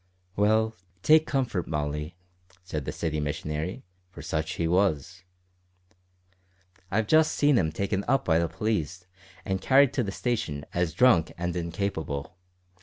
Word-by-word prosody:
"Well, 110 +2 +2 0.3
take 155 0 +5
comfort, 120 -10 -1
Molly," 75 +1 -3 0.5
said 75 -6 -4
the - - -2
city 80 -2 -2
missionary, 75 - -3 0.3
for - - -11
such 80 0 -2
he 85 - -1
was; 95 0 +1 1.7
"I've 110 +3 +1
just 155 +6 +4
seen 145 -1 +3
him 80 -9 +2
taken 100 +4 -1
up 135 +1 +2
by 80 -1 +3
the 85 - +1
police 90 -2 -2 0.4
and 95 0 -2
carried 135 +4 +5
to 130 - +1
the 100 -4 -2
station 95 - -2
as 85 -2 -1
drunk 115 -8 +4
and 90 0 -2
incapable. 85 -4 -3
90 Hz, 140 wpm, -27 LUFS, 80-110 Hz, 1.7 s, take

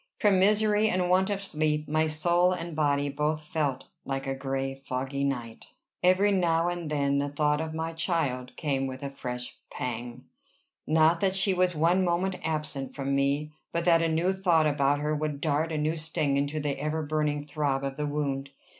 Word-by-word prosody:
From 205 -3 +4
misery 210 +2 +3
and 180 -1 +1
want 190 +2 +3
of 200 -1 -2
sleep, 150 -4 0
my 155 +1 +2
soul 175 +4 +2
and 170 -2 -5
body 145 -2 +1
both 150 +2 -1
felt 145 -4 -2 0.2
like 135 0 -3
a 135 - -1
gray 135 0 -2
foggy 135 +1 -4
night. 120 -5 -3 0.4
Every 185 +3 +4
now 170 -3 +2
and 175 -3 -4
then 140 -2 +1
the 145 0 -1
thought 150 +1 +1
of 160 0 -4
my 160 +1 -3
child 140 -7 -1
came 135 -3 -1
with 130 +1 -7
a 140 - -4
fresh 125 -2 -6
pang, 120 0 -5 0.6
not 160 +2 +4
that 190 0 +1
she 195 0 +2
was 180 -1 +1
one 170 +4 +3
moment 180 +2 0
absent 150 -4 -3
from 140 0 -2
me, 140 +2 +1 0.2
but 170 0 -1
that 165 -2 +5
a 165 - +2
new 170 +4 +1
thought 175 -5 +3
about 145 -1 +2
her 150 +1 0
would 150 -1 -2
dart 155 +2 0
a 155 - -1
new 155 +2 0
sting 155 -3 -1
into 145 +2 0
the 145 -2 -2
ever 155 +2 -1
burning 150 -1 -1
throb 140 -2 -1
of 135 -1 -3
the 150 0 -1
wound. 140 -2 -2
150 Hz, 190 wpm, -28 LUFS, 140-170 Hz, 0.6 s, that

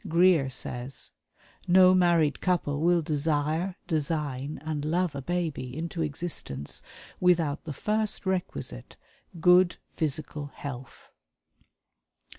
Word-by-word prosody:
Greer 170 -4 +4
says: 125 +1 -3 0.6
"No 185 +1 +7
married 170 -5 +3
couple 160 -6 0
will 170 0 +3
desire, 155 +4 0
design 150 -3 -2
and 155 -2 -2
love 170 +2 0
a 140 - -5
babe 170 0 -2
into 160 +7 -4
existence 145 - -4 0.4
without 170 -5 +2
the 155 - -4
first 210 +7 -1
requisite 175 - -3 0.4
good 180 +1 +5 0.2
physical 150 -1 -3
health." 130 -3 -8
160 Hz, 100 wpm, -28 LUFS, 145-175 Hz, 0.6 s, No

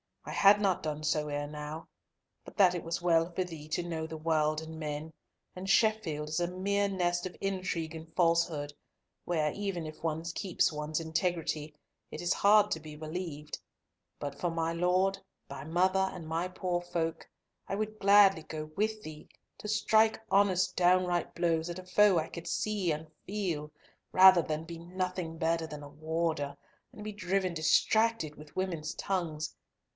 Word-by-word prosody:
I - - -6
had 205 +1 +6
not 195 -3 +2
done 155 -1 -4
so 150 0 +1
ere 145 0 -2
now, 150 +2 -7 0.6
but - - -12
that 185 -3 +6
it 175 - -4
was 165 +1 -3
well 165 0 +3
for 185 +2 -1
thee 160 -4 -9
to 175 - -1
know 160 -2 -3
the 160 0 -6
world 155 -1 +1
and 160 0 -8
men, 155 +1 -4 0.4
and 185 +1 -6
Sheffield 195 -9 +2
is 155 - -1
a 175 - +1
mere 200 +3 0
nest 175 -2 0
of 180 - -11
intrigue 185 -4 -2
and 160 0 -9
falsehood, 165 -4 +2 0.5
where 155 -3 +1
even 195 -4 -3
if 155 0 -9
one 160 0 -2
keeps 170 +2 0
one's 150 +1 -2
integrity, 160 -2 -2 0.3
it - - -7
is 175 0 +2
hard 210 +1 +5
to 160 - 0
be 155 -1 -10
believed. 155 -1 -5 0.6
But 145 -1 -5
for 175 - 0
my 165 0 -1
Lord, 180 +3 +2 0.3
thy 135 - -7
mother, 185 +4 +2
and 170 -4 -8
my 165 +3 -1
poor 180 -1 -2
folk, 170 -2 -3 0.4
I - - -2
would 215 +1 -3
gladly 200 -4 +6
go 155 -1 -6
with 215 +1 -1
thee 155 -1 -9 0.3
to - - -7
strike 220 +1 +3
honest 195 -2 +3
downright 180 -1 +2
blows 165 -1 +1
at 175 +1 -5
a 185 - -10
foe 195 +1 +5
I 160 - 0
could 170 -1 -8
see 205 -5 0
and 155 +1 -4 0.2
feel, 175 -7 -3 0.4
rather 185 -1 +8
than 155 0 -3
be 165 0 -8
nothing 180 -1 -4
better 165 0 0
than 150 -1 -8
a 145 - -9
warder, 155 -1 -2 0.3
and 210 - -10
be 215 - -4
driven 190 -2 -1
distracted 170 +1 +2
with 150 0 -14
women's 185 -5 -2
tongues. 165 -5 -2
170 Hz, 175 wpm, -31 LUFS, 155-185 Hz, 0.6 s, rather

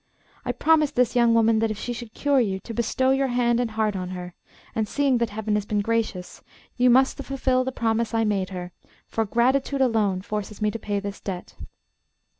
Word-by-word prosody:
I - - -1
promised 305 -2 +2
this 250 0 +2
young 235 -1 +4
woman 225 -1 +4
that 225 0 +1
if 215 - -3
she 240 +3 -4
should 235 -2 -9
cure 285 -2 +2
you, 195 -6 0
to 230 - -8
bestow 240 +3 +1
your 270 0 +2
hand 245 -1 +1
and 245 -2 0
heart 215 -1 -1
on 185 -1 -4
her, 180 -1 -7 0.4
and 220 -1 -1
seeing 275 -2 +1
that 235 -2 0
Heaven 215 0 -3
has 210 -1 0
been 210 -1 0
gracious, 215 -4 -2 0.3
you 250 0 +4
must 265 +3 +4
fulfil 265 -2 0
the 260 - -3
promise 230 -1 0
I 225 -1 +1
made 200 -3 0
her; 180 -2 -6 0.3
for 225 - -1
gratitude 260 +5 +1
alone 215 -7 +1
forces 210 0 -5
me 210 0 +1
to 230 - -5
pay 205 -1 -2
this 200 0 -6
debt. 185 -3 -6
225 Hz, 210 wpm, -24 LUFS, 210-250 Hz, 0.4 s, young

